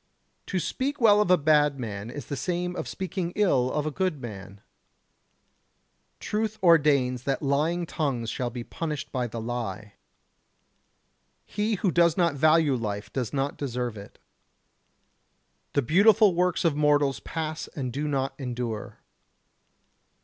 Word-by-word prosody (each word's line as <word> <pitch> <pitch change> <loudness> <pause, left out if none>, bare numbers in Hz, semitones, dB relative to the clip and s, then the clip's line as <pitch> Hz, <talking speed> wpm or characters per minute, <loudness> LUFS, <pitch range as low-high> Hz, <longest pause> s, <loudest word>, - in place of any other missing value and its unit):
To 190 - -2
speak 270 - -2
well 210 -3 +6
of 210 - 0
a 180 - +6
bad 150 -2 +3
man 105 -2 -5
is 140 0 -7
the 140 - -4
same 180 +4 -2
as - - -4
speaking 185 -2 -4
ill 135 -12 +2
of 150 0 -1
a 155 - -1
good 185 -2 -1
man. 100 -5 -9 1.6
Truth 215 0 -2
ordains 140 -7 +4
that 135 +2 -1
lying 155 +5 +1
tongues 130 -9 -2
shall 125 -1 -2
be 120 0 -6
punished 150 +1 -5
by 125 -2 -1
the 115 0 -6
lie. 115 -3 -5 1.5
He 210 +2 -1
who 190 -1 0
does 170 -1 +3
not 170 -3 +3
value 155 0 +4
life 105 -4 -4
does 125 -4 -2
not 140 0 -2
deserve 125 -4 -3
it. 100 -1 -11 1.6
The 140 - +2
beautiful 205 - +5
works 180 0 +1
of 160 -4 +3
mortals 145 -4 +2
pass 155 +6 -4
and 130 -4 -4
do 150 +2 -2
not 135 -2 -1
endure. 120 -4 -5
145 Hz, 140 wpm, -26 LUFS, 125-175 Hz, 1.6 s, well